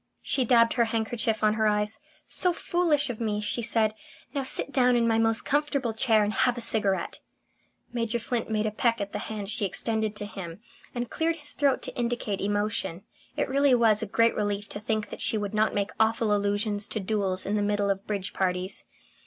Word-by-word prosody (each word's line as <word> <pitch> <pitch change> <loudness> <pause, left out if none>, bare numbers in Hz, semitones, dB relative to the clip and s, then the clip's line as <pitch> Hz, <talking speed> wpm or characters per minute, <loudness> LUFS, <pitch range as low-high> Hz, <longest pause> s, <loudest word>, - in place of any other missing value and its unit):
She 260 - +1
dabbed 230 -1 +4
her 235 - +2
handkerchief 225 -1 -1
on 215 0 +4
her 220 0 +1
eyes. 210 +3 0 0.3
"So 360 -1 +3
foolish 330 -6 +1
of 235 - -8
me!" 210 -2 -1
she 210 +3 -1
said. 220 -2 +1 0.4
"Now 280 - -1
sit 270 +1 0
down 250 -2 +3
in 235 -1 +2
my 225 -1 +2
most 225 0 +2
comfortable 280 -5 0
chair 220 -2 +3
and 205 +1 -1
have 245 +1 +1
a - - -2
cigarette." 205 -5 +2 0.7
Major 235 -1 -1
Flint 235 0 -3
made 215 -1 0
a 215 - 0
peck 230 +2 +1
at 200 0 -4
the - - -2
hand 210 -2 -5
she 215 - 0
extended 220 +2 -1
to 210 - -3
him, 190 -4 -8 0.4
and 240 -1 -3
cleared 325 +1 0
his 295 -2 -1
throat 280 -2 +1
to - - -5
indicate 235 -4 -2
emotion. 205 -3 -2 0.3
It - - 0
really 275 0 +3
was 225 -3 +3
a 220 - -3
great 230 +3 +3
relief 205 0 -2
to 205 - -5
think 215 0 -2
that - - -7
she 220 - +1
would 205 0 -3
not 215 +1 +1
make 200 0 -1
awful 220 -1 +2
allusions 205 0 0
to 220 - -3
duels 195 -2 -1
in 205 - -1
the 210 - +1
middle 205 -1 +1
of 195 0 -4
bridge 200 -3 -3
parties. 185 0 -1
220 Hz, 210 wpm, -27 LUFS, 205-240 Hz, 0.7 s, dabbed